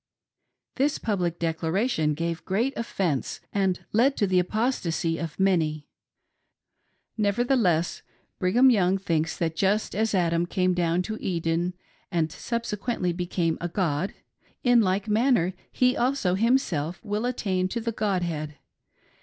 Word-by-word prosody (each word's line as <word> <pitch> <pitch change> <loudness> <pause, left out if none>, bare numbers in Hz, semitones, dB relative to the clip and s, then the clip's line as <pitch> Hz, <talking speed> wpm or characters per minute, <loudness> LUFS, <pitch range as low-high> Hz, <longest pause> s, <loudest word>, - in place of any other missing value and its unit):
This 280 +3 +2
public 180 -6 -1
declaration 165 - 0
gave 165 +1 -3
great 230 +8 0
offence 185 - -2
and 190 -3 0
led 255 +6 +3
to 205 - +2
the 185 -1 +3
apostacy 180 -5 -1
of 165 0 -5
many. 160 -6 +1 1.3
Nevertheless 205 -5 +1 0.4
Brigham 240 +8 +5
Young 190 -4 +3
thinks 165 -4 -1
that 165 -2 -1
just 200 +5 +1
as 220 +1 0
Adam 170 -1 +1
came 185 0 +1
down 175 0 +1
to 220 +3 -5
Eden 170 0 -1 0.4
and 160 -2 0
subsequently 230 -5 -2
became 175 -2 -1
a 175 - -2
god, 175 -1 -1 0.5
in 245 -2 +5
like 195 +1 0
manner 215 -4 +2 0.2
he, 250 0 +2
also 245 -7 +1
himself 190 - +1
will 210 +3 -1
attain 190 -7 0
to 235 +5 -3
the 230 0 -2
god 200 -4 0
head. 155 -3 -4
185 Hz, 130 wpm, -26 LUFS, 170-220 Hz, 1.3 s, Brigham